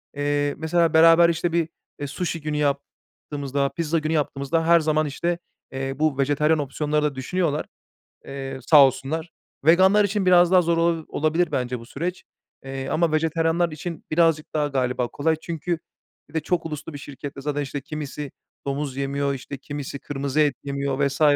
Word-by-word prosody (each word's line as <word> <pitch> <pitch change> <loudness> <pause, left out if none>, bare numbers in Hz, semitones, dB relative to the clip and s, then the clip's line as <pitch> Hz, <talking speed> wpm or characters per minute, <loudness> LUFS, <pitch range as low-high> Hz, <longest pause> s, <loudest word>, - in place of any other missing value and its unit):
Eee, 145 0 0
mesela, 165 +2 +1
beraber 165 +1 +7
işte 170 +1 0
bir, 165 -1 +1 0.3
eee, 145 - -3
suşi 165 +1 -3
günü 150 0 -2
yaptığımızda, 140 -1 -2
pizza 165 -1 -1
günü 155 +1 -2
yaptığımızda 150 +2 0
her 170 0 +7
zaman 155 -1 +1
işte 170 +4 -2 0.6
bu 150 -1 +1
vejetaryen 145 +3 +2
opsiyonları 150 +1 -1
da 150 -2 0
düşünüyorlar. 155 +3 -1 0.6
Eee, 135 -1 -6
sağ 145 -4 +9
olsunlar. 155 +5 -2 0.4
Veganlar 190 +5 +6
için 200 -1 -1
biraz 180 -1 +6
daha 185 -1 +7
zor 170 -1 +1
olabili 165 -1 +1
olabilir 160 +3 +1
bence 125 -1 -1
bu 115 - -11
süreç. 175 +8 -4 0.4
Eee, 135 0 -5
ama 165 0 +1
vejetaryenler 165 +2 +1
için 160 +2 -6
birazcık 160 -1 +2
daha 150 -1 +1
galiba 125 -3 0
kolay. 160 +6 0
Çünkü 170 0 -3 0.5
bir - - -20
de 160 - +1
çok 170 +2 -1
uluslu 155 0 -6
bir - - -6
şirkette 140 0 -8
Zaten 145 0 -2
işte 140 0 -4
kimisi 150 -1 -6 0.3
domuz 140 -1 -3
yemiyor, 140 0 -1
işte, 135 +1 -7
kimisi 140 0 -6
kırmızı 140 +1 -3
et 145 -4 +3
yemiyor 140 -1 -2
vs. 140 +2 -6
150 Hz, 165 wpm, -24 LUFS, 140-165 Hz, 0.6 s, sağ